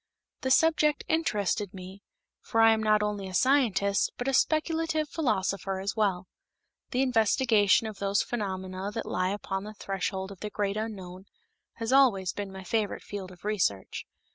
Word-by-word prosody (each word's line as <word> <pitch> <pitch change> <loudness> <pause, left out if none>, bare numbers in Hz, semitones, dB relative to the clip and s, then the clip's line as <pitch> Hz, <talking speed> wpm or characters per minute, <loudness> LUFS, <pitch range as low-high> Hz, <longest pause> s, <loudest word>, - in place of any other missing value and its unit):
The 260 - -2
subject 305 +1 +3
interested 210 - 0
me, 190 +1 -10 0.4
for 225 - -2
I 225 0 +7
am 220 - -1
not 215 -1 +3
only 205 -2 -2
a 185 - -6
scientist, 215 -6 +2
but 245 - -4
a 270 - +1
speculative 315 +1 +1
philosopher 195 - -1
as 195 +2 -3
well. 195 -5 0 0.6
The 255 +1 +1
investigation 225 -3 +3
of 215 -2 -6
those 200 0 +1
phenomena 190 -3 -4
that 225 - -3
lie 185 0 -1
upon 195 -1 -3
the 215 +1 -9
threshold 195 -1 -3
of 195 - -11
the 210 - -4
great 205 -1 -2
unknown 190 -4 -6 0.5
has 230 +2 -2
always 200 -10 +4
been 200 -1 -5
my 190 0 -9
favorite 210 +2 -1
field 195 -2 -7
of 180 +2 -15
research. 180 - -1
205 Hz, 165 wpm, -28 LUFS, 190-230 Hz, 0.6 s, I